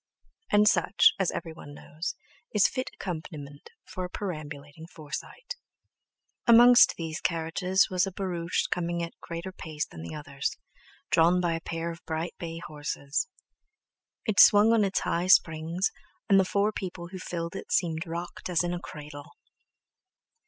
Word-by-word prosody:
And 210 0 +5
such, 180 -1 +5
as 190 - +2
everyone 160 -3 -7
knows, 155 +4 -6 0.4
is 205 - +6
fit 260 -1 -4
accompaniment 155 -5 -7 0.2
for 185 - -6
a 180 - -4
perambulating 155 -4 -7
Forsyte. 180 - -8 0.9
Amongst 240 +1 +8
these 160 -2 -4
carriages 175 +3 +1
was 185 +1 +2
a - - -4
barouche 180 -3 -2
coming 170 -1 -1
at 170 - -6
a - - -43
greater 170 +3 -6
pace 155 -4 -4
than 80 - -11
the 85 - -7
others, 140 -2 -4 0.5
drawn 170 +2 +4
by 175 -2 +1
a 165 - -3
pair 165 +1 -4
of 165 - -11
bright 165 +1 -3
bay 165 -1 -5
horses. 145 - -3 1.0
It 215 -4 +1
swung 210 +2 +8
on 225 -2 +4
its 195 -1 0
high 175 +2 -1
springs, 165 0 +3 0.4
and 195 -1 +6
the 190 - +3
four 200 +3 +1
people 180 -4 -6
who 185 0 -8
filled 170 -2 -5
it - - -7
seemed 165 -1 0
rocked 170 +2 -6
as 175 -1 +2
in 175 0 -1
a 175 - -3
cradle. 150 -2 -10
170 Hz, 155 wpm, -28 LUFS, 160-190 Hz, 1.0 s, Amongst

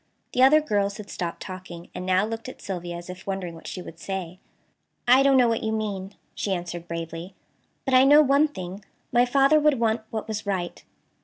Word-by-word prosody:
The 250 - +2
other 290 +4 +7
girls 205 -7 0
had 210 -2 -9
stopped 170 -1 -4
talking, 185 -3 -9
and 180 - -6
now 185 +2 +3
looked 225 +3 -5
at - - -11
Sylvia 175 -3 -5
as 175 - -9
if 180 +1 -9
wondering 190 -3 -3
what 165 - -11
she 180 - -6
would 165 -1 -11
say. 185 -1 -5 0.7
"I 255 +2 +7
don't 275 -1 +5
know 250 -2 +5
what 230 -1 0
you 220 - -1
mean," 205 -3 -3 0.2
she 200 - -2
answered 175 -1 -6
bravely, 165 +2 -6 0.5
"but 265 - -1
I 255 0 +7
know 295 +3 +7
one 280 +2 +4
thing: 190 -7 -8 0.3
my 240 +1 +4
father 275 +4 +5
would 300 -4 +3
want 225 0 +1
what 220 -1 -4
was 215 -1 -3
right." 185 -3 -3
200 Hz, 210 wpm, -25 LUFS, 180-250 Hz, 0.7 s, other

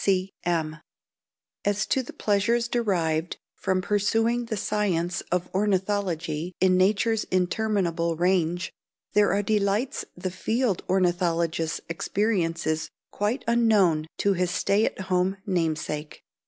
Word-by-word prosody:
C. - - +1
C. 190 0 +1
M. 160 -2 0 0.9
As 205 -1 +1
to 265 - +1
the 250 - -9
pleasures 225 +3 +1
derived 175 -9 0 0.2
from 185 -1 -1
pursuing 225 +4 +1
the 225 -2 -3
science 185 -4 0
of 180 0 0
ornithology 185 -4 -1
in 185 0 +4
nature's 210 +4 +2
interminable 180 -3 0
range, 175 +1 +1 0.4
there 205 0 +4
are 205 - +1
delights 210 +4 0
the 185 +1 -3
field 220 +2 0
ornithologist 170 -3 +1
experiences 165 -3 -1 0.2
quite 215 +6 -1
unknown 205 -10 +3
to 200 - +2
his 180 -1 0
stay 200 +4 +2
at - - -3
home 185 +1 0
namesake. 155 -4 -2
185 Hz, 120 wpm, -26 LUFS, 170-210 Hz, 0.9 s, in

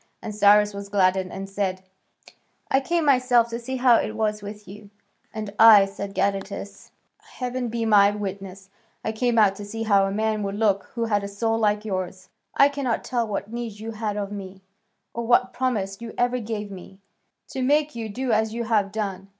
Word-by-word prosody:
And 215 - -6
Cyrus 210 0 +5
was 200 0 -7
gladdened 190 -2 +2
and 195 0 -6
said, 195 -1 -3 0.9
"I 270 - +4
came 335 +3 -1
myself 250 -4 +4
to 230 0 -4
see 260 +2 -5
how 250 -2 +5
it 215 - -2
was 215 -1 -1
with 205 0 -9
you." 205 +2 -12 0.4
"And 215 -2 -6
I," 215 -3 +9
said 200 0 -7
Gadatas, 200 0 -3 0.3
"heaven 250 -1 -5
be 230 0 -2
my 205 -2 +6
witness, 195 -1 -6 0.3
I - - 0
came 235 +1 0
out 210 -3 +5
to 205 - -7
see 225 +2 -5
how 200 -3 +3
a - - -3
man 215 +1 -1
would 200 0 -3
look 205 -2 +1
who 235 -1 -1
had 205 -2 0
a - - -3
soul 225 +3 -1
like 210 -1 +1
yours. 185 -1 -4 0.3
I 280 - +7
cannot 280 -4 -2
tell 240 -3 -1
what 205 +1 -4
need 235 -3 -5
you 225 +1 -6
had 215 -2 -3
of 200 -1 -3
me, 190 -1 -8 0.5
or 235 0 -4
what 250 +1 +3
promise 215 -6 -2
you 230 -1 -8
ever 245 +1 +1
gave 210 -2 -5
me, 190 0 -11 0.5
to 265 - -4
make 295 +3 +2
you 225 -2 -5
do 250 +4 -3
as 220 0 +1
you 235 - -2
have 215 -4 +1
done. 195 -3 -4
210 Hz, 200 wpm, -24 LUFS, 200-235 Hz, 0.9 s, I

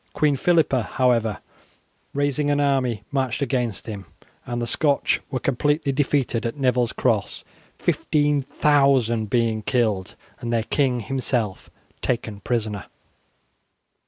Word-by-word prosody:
Queen 150 -2 +2
Philippa, 160 -4 +2
however, 115 -3 +1 0.7
raising 145 +1 0
an 145 0 +2
army, 130 -6 +1
marched 130 -4 -1
against 125 -7 -1
him, 100 -5 -7 0.4
and 120 0 -3
the 120 - -1
Scotch 140 +4 +2
were 130 - -2
completely 145 +3 0
defeated 135 -3 0
at 115 +4 -3
Neville's 125 -3 +2
Cross, - - -1 0.3
15,000 140 -5 +2
being 115 -1 +1
killed 110 -6 0 0.2
and 120 - -4
their 115 -1 +1
king 125 -1 +1
himself 120 -4 -2 0.3
taken 115 -4 -2
prisoner. 110 -4 -2
125 Hz, 115 wpm, -23 LUFS, 115-140 Hz, 0.7 s, Queen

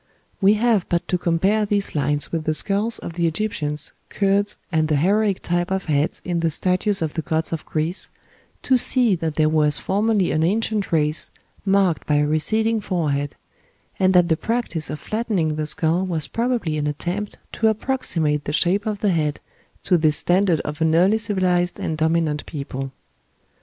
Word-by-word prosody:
We 200 +2 +5
have 220 -4 +1
but 170 -1 0
to 180 - +1
compare 190 +6 +1
these 205 -1 -1
lines 145 0 -1
with 165 -2 -3
the 155 - +1
skulls 205 +6 +3
of 170 - -7
the 170 0 0
Egyptians, 155 -5 -2 0.2
Kurds, 200 +1 +1
and 160 -2 +1
the 155 - +1
heroic 200 +6 +1
type 175 0 -1
of 190 0 -2
heads 150 -1 0
in 175 -1 -1
the 165 0 +1
statues 185 +3 0
of 155 - -3
the 165 - -2
gods 160 +1 -1
of 160 - -5
Greece, 160 +4 -2 0.5
to 260 -1 +3
see 245 -3 +3
that 160 -2 -3
there 155 -1 +3
was 150 -1 +3
formerly 205 -1 +1
an 155 - +1
ancient 210 +4 0
race 155 -1 +1 0.4
marked 195 -4 +2
by 150 - +2
a 145 0 +3
receding 220 +9 +1
forehead; 145 -7 -2 0.6
and 185 0 +4
that 180 -1 +5
the 160 - +2
practice 200 - -2
of 150 +1 -5
flattening 200 -6 -1
the 155 0 -2
skull 160 +4 +1
was 170 -5 -2
probably 230 -10 -1
an 150 - -1
attempt 180 +8 -4
to 225 - +1
approximate 170 - 0
the 145 - -3
shape 195 +6 +2
of 210 -2 -3
the 205 - +2
head 150 -4 -1 0.4
to 180 -3 +2
this 155 -2 +3
standard 180 -2 +2
of 150 +1 -6
an 160 0 +3
early 190 +6 +4
civilized 185 -4 0
and 160 - -2
dominant 160 -2 +1
people. 135 -3 -5
175 Hz, 180 wpm, -22 LUFS, 155-205 Hz, 0.6 s, We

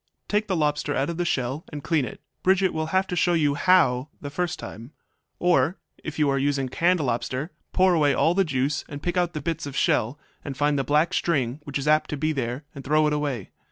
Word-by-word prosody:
Take 210 +1 0
the 190 - 0
lobster 150 -2 0
out 140 +5 0
of 165 - -6
the 175 - 0
shell 135 0 -1
and 145 -2 -6
clean 155 -6 +1
it; - - -9 0.2
Bridget 190 0 +3
will 160 0 -2
have 190 +3 +1
to 180 - -4
show 175 0 +2
you 150 -4 +2
how 145 -5 +3
the 145 - -7
first 175 +3 -2
time. 115 +7 -9 0.4
Or, 175 -1 +2 0.3
if 155 0 -6
you 150 -2 +3
are 135 0 +1
using 135 -1 0
canned 175 +6 +2
lobster, 130 +3 -2 0.2
pour 185 0 +4
away 150 -4 +3
all 165 - +3
the 195 +2 +3
juice 140 -2 -1
and 145 0 -8
pick 175 0 -1
out 175 -2 +1
the 150 - -4
bits 165 -3 -3
of 135 -2 -6
shell, 120 +3 +1 0.3
and 135 -2 -6
find 145 -1 +2
the - - +1
black 150 +6 +2
string 140 -8 0
which 145 - -3
is 140 +1 -4
apt 155 0 +3
to 150 - -3
be 155 +2 0
there, 130 -1 -3
and 140 - -9
throw 155 +3 +3
it 150 - +1
away. 140 -9 -2
150 Hz, 235 wpm, -25 LUFS, 140-170 Hz, 0.4 s, pour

